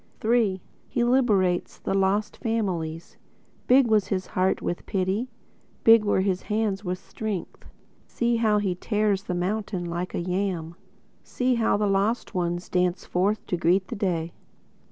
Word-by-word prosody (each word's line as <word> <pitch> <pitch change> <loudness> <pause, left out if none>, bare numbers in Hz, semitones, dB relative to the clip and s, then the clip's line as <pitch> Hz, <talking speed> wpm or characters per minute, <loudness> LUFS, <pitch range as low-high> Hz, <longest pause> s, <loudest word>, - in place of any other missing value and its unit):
III 220 -5 +2 0.3
(He 240 - 0
liberates 210 -8 +2
The - - -3
Lost 195 +2 +1
Families) 175 -8 -3 0.5
Big 260 +1 +6
was 215 -3 +2
his 185 -1 -1
heart 185 +1 0
with 175 - -4
pity; 195 +6 -1 0.5
Big 225 -1 +7
were 205 -2 +2
his 190 -1 0
hands 210 -2 -1
with 180 -1 -2
strength. 205 0 -6 0.4
See 235 0 0
how 220 -2 +3
he 200 -3 0
tears 205 +1 0
the 180 - -2
mountain 190 0 -2
like 175 +2 -4
a - - -1
yam! 180 -2 -2 0.5
See 255 0 0
how 225 -3 +2
the 210 - +1
lost 200 +5 0
ones 175 -1 -2
Dance 180 0 0
forth 200 +4 0
to - - -1
greet 180 +3 +2
the - - -4
day! 170 -5 -1
195 Hz, 155 wpm, -25 LUFS, 180-215 Hz, 0.5 s, Big